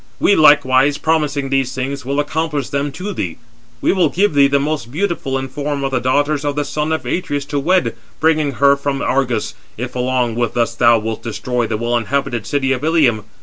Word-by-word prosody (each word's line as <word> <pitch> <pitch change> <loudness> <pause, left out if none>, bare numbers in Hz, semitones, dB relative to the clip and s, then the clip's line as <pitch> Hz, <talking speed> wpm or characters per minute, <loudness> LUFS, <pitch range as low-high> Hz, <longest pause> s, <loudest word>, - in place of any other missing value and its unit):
We 205 - +4
likewise, 140 -2 +5
promising 150 -4 0
these 135 -1 0
things, 135 +1 -3
will 140 +3 -2
accomplish 145 -1 -2
them 140 0 -2
to 200 +6 -5
thee. 85 - -4 0.4
We - - +2
will 180 -5 +2
give 195 +3 +1
thee 140 -1 +5
the 140 0 +2
most 145 -4 -3
beautiful 155 -5 -2
in 135 0 -4
form 145 +1 -3
of 135 - -1
the 130 - +1
daughters 145 +4 +1
of 145 -1 -1
the 145 0 -1
son 150 +2 -2
of 160 - -2
Atreus 145 -5 -2
to 145 0 -2
wed, 155 -6 +1 0.2
bringing 155 -3 +2
her 140 +2 +4
from 140 0 -3
Argos, 125 -4 0 0.2
if - - -5
along 125 -2 0
with 120 0 -1
us 120 0 +1
thou 115 0 +4
wilt 110 0 -4
destroy 120 +1 -2
the 110 - -2
well 120 +2 -1
inhabited 120 0 -1
city 135 -2 0
of 130 +1 -1
Ilium. 145 -10 +2
140 Hz, 205 wpm, -18 LUFS, 125-150 Hz, 0.4 s, likewise